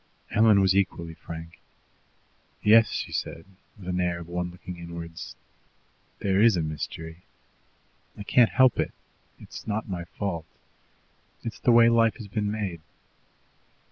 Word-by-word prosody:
Helen 110 -2 +5
was 95 0 +3
equally 85 -4 0
frank. 80 0 -9 1.0
"Yes," 110 +1 +6
she - - -4
said, 80 - -4 0.3
with 90 -2 -4
the 90 - +1
air 90 -1 0
of 85 -1 -9
one 90 0 -3
looking 90 0 -9
inwards, 85 -1 -8 0.8
"there 95 0 +1
is 110 -4 +5
a 85 - 0
mystery. 80 +1 -5 1.0
I 105 - -6
can't 120 +2 +4
help 130 -2 +4
it. - - -1 0.5
It's - - -11
not 110 0 -2
my 90 -3 -4
fault. 85 -2 -4 1.0
It's 115 - -6
the 120 - +3
way 115 0 +7
life 115 -1 +4
has 110 - -9
been 105 +1 -2
made." 100 -6 -3
95 Hz, 140 wpm, -26 LUFS, 85-110 Hz, 1.0 s, way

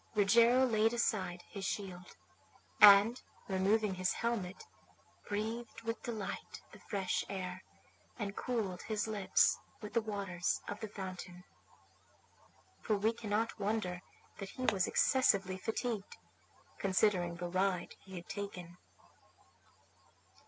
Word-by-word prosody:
Rogero 230 +5 +5
laid 225 -1 +2
aside 185 -7 -1
his 200 - -7
shield, 185 -3 -4 0.6
and, 210 +4 +8 0.3
removing 195 +2 +2
his 185 0 0
helmet, 215 -6 -2 0.7
breathed 225 +3 -4
with 230 0 -3
delight 220 -4 -5
the - - -13
fresh 195 -3 -1
air, 185 -1 -4 0.6
and 205 -4 -4
cooled 210 -8 -2
his 215 -1 -2
lips 210 -3 +3 0.2
with 210 - -8
the 230 - +3
waters 200 -5 -2
of 205 - -5
the 220 - -4
fountain. 185 -3 -7 1.4
For 215 -2 +1
we 220 +3 +2
cannot 225 0 -2
wonder 195 -4 -1 0.4
that 195 - -5
he 255 - -7
was 190 -7 +2
excessively 195 -8 +3
fatigued, 225 -1 -3 0.6
considering 185 -3 +2
the 175 +1 -5
ride 185 0 0
he 190 -1 -11
had 175 -1 -8
taken. 180 -4 -6
200 Hz, 115 wpm, -34 LUFS, 185-220 Hz, 1.4 s, and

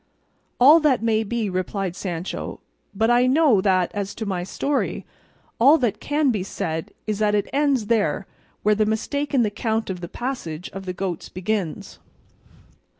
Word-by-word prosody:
"All 290 +7 +8
that 280 -7 +2
may 220 -1 +2
be," 225 0 -2
replied 185 0 -2
Sancho, 180 -1 -5 0.3
"but 220 +3 +1
I 245 +1 +4
know 265 -6 +4
that 185 -2 +2
as 200 -1 -4
to 220 - -4
my 185 -3 -2
story, 275 +9 -2 0.5
all 280 +7 +7
that 240 -8 -1
can 290 -2 +1
be 210 -5 -1
said 160 -3 -4
is 215 -1 -2
that 210 -1 +2
it 205 - 0
ends 280 -5 +2
there 205 -6 +1 0.4
where 210 - +4
the 215 0 +1
mistake 285 +7 -1
in 265 -4 +3
the 210 - 0
count 220 -1 -1
of 180 -1 -6
the 170 - -6
passage 185 - -5
of 190 0 -8
the 180 - -2
goats 180 -2 -4
begins." 185 -2 -3
215 Hz, 170 wpm, -23 LUFS, 185-245 Hz, 0.5 s, All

